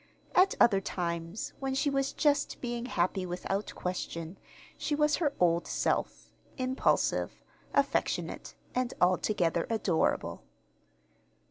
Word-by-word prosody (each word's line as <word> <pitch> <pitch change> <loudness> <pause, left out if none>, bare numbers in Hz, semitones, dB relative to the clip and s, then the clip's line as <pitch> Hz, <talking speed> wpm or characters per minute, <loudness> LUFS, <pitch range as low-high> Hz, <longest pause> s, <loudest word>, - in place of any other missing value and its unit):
At 370 +2 +5
other 195 -4 +5
times, 170 +1 -3
when 270 -1 -2
she 285 +1 +1
was 275 0 +1
just 290 -1 +1
being 240 0 -3
happy 185 -3 0
without 185 +3 -3
question, 180 -1 -4 0.4
she 295 - -1
was 300 0 +3
her 290 -5 0
old 170 -1 +3
self - - -1 0.3
impulsive, 255 0 +1 0.3
affectionate, - - 0 0.2
and 250 -1 -1
altogether 180 -2 +2
adorable. 210 -7 0
210 Hz, 110 wpm, -30 LUFS, 180-270 Hz, 0.4 s, At